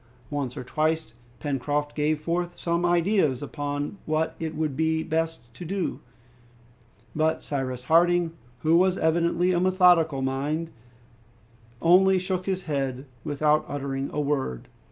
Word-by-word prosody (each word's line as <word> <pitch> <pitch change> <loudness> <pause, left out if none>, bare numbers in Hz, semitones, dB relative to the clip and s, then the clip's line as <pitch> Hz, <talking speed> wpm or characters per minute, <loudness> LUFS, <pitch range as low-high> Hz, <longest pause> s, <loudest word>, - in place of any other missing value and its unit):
Once 140 -4 -3
or - - -4
twice 155 -1 -1 0.3
Pencroft 145 +2 -1
gave 150 0 0
forth 175 +2 -2
some 170 +1 0
ideas 175 - +2
upon 145 +4 -4
what 155 +1 0
it 160 -1 -4
would 155 -3 -1
be 160 +1 +1
best 165 0 -1
to 150 - -9
do; 185 +2 -2 1.2
but 160 +1 +1
Cyrus 130 -3 -3
Harding, 170 +3 +3 0.3
who 160 +4 +4
was 185 +1 +3
evidently 170 +2 +2
of 175 -1 +1
a - - +2
methodical 175 -7 +4
mind, 145 +5 -2 1.1
only 190 +3 +6
shook 185 0 -2
his 190 -1 -1
head 135 -3 -2 0.2
without 150 +1 +2
uttering 135 -1 -3
a - - -3
word. 140 - -2
160 Hz, 135 wpm, -26 LUFS, 145-175 Hz, 1.2 s, only